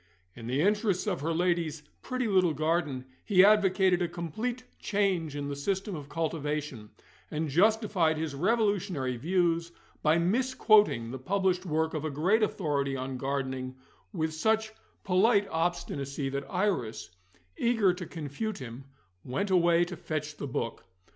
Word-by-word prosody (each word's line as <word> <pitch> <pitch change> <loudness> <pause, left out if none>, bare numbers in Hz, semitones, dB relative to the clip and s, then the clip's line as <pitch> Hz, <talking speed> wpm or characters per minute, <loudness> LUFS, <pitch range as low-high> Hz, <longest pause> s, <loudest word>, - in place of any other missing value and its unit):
In 115 -1 -8
the 130 +4 0
interests 205 0 +1
of 190 -7 -1
her 160 +3 -1
ladyship's 165 -3 0
pretty 255 -2 -2
little 185 -6 +3
garden, 155 -4 0 0.2
he 190 -3 +6
advocated 190 -3 +4
a 175 - +1
complete 215 - -4 0.2
change 190 -7 0
in 145 -1 -3
the 140 - -3
system 190 +7 -2
of 145 -2 -8
cultivation, 150 -7 -3 0.4
and 155 0 -2
justified 190 -1 +3
his 155 -2 -3
revolutionary 190 - 0
views 170 +4 0 0.3
by 155 +2 +4
misquoting 210 - +3
the 130 - -6
published 185 +4 0
work 160 0 0
of 155 -2 -3
a 155 - -1
great 180 +10 +2
authority 145 -9 0
on 130 0 -4
gardening 130 -1 -3 0.4
with 160 -5 -2
such 220 +6 +1 0.3
polite 200 +2 +3
obstinacy 145 -5 -2
that 140 0 -4
Iris 125 - -1 0.4
(eager 225 -6 +2
to 180 -2 -7
confute 165 +7 -4
him) 125 +1 -8 0.4
went 145 +11 -2
away 175 -1 +4
to 175 0 -7
fetch 155 -2 -4
the 145 - -4
book. 115 -3 -3
170 Hz, 145 wpm, -29 LUFS, 145-195 Hz, 0.4 s, he